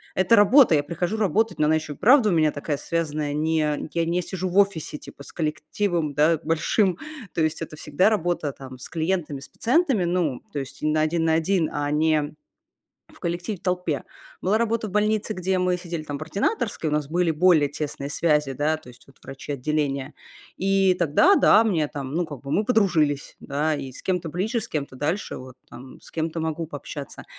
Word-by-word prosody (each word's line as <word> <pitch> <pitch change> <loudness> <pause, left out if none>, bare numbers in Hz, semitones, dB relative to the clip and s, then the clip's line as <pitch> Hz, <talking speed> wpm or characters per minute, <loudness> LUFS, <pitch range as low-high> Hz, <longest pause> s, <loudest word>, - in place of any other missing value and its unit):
Это 185 +5 +4
работа, 230 - +6
я 145 - +2
прихожу 175 +7 -2
работать, 215 +1 +1
но 150 - +3
она 155 - +3
еще 155 -1 -3
и - - -14
вправду 245 -1 +5
у 185 - +2
меня 155 -2 +3
такая 145 0 -3
связанная, 150 -3 -2
не 160 +2 0 0.4
я 170 -1 +1
не 175 +2 0
сижу 185 +1 -4
в 180 - -2
офисе 195 -7 +2
типа 140 - -12
с - - -13
коллективом, 160 +1 -1
да, 155 +2 +3
большим. 170 +4 +1 0.4
То - - -1
есть 155 +1 0
это 155 - -6
всегда 165 +9 +2
работа 175 -8 -1
там 130 -1 -10
с - - -9
клиентами, 160 -4 -2
с 140 - -12
пациентами, 250 - +1
ну, 170 -7 0
то 145 - -2
есть 135 0 -8
на 155 0 +2
1 160 +1 +1
на 160 - +3
1, 165 0 +1
а 145 0 -1
не 155 -1 +1 0.8
в - - -19
коллективе, 175 +4 -3
в - - -32
толпе. 180 -6 -1 0.4
Была 195 +4 +2
работа 230 -1 0
в - - -9
больнице, 210 +1 0
где 185 +1 0
мы 180 0 +1
сидели 175 -3 -5
там 145 -2 -5
в - - -9
ординаторской, 200 - -1
у - - -5
нас 150 -2 0
были 175 0 +1
более 160 -2 +4
тесные 145 -1 -5
связи, 150 -4 +1
да, 150 +4 0
то 140 - -17
есть 125 0 -15
вот 135 - -21
врачи 135 +2 -7
отделения. 140 0 -2 0.4
И 195 0 +3
тогда- 175 - +4
да, 215 - +6
мне 165 -9 +1
там, 140 0 -6
ну, 175 +1 +1
как 145 -5 -8
бы 140 - -8
мы 210 +8 +1
подружились, 170 - +1
да, 150 +3 -1
и 135 -2 -6
с - - -12
кем-то 180 -4 -1
ближе, 215 - -1
с 230 - -8
кем-то 140 -4 -4
дальше. 160 +10 -2
Вот, 130 0 -10
там, 130 +1 -12
с - - -16
кем-то 160 0 -3
могу 160 +1 -2
пообщаться. 145 -1 -8
160 Hz, 205 wpm, -24 LUFS, 150-185 Hz, 0.8 s, работа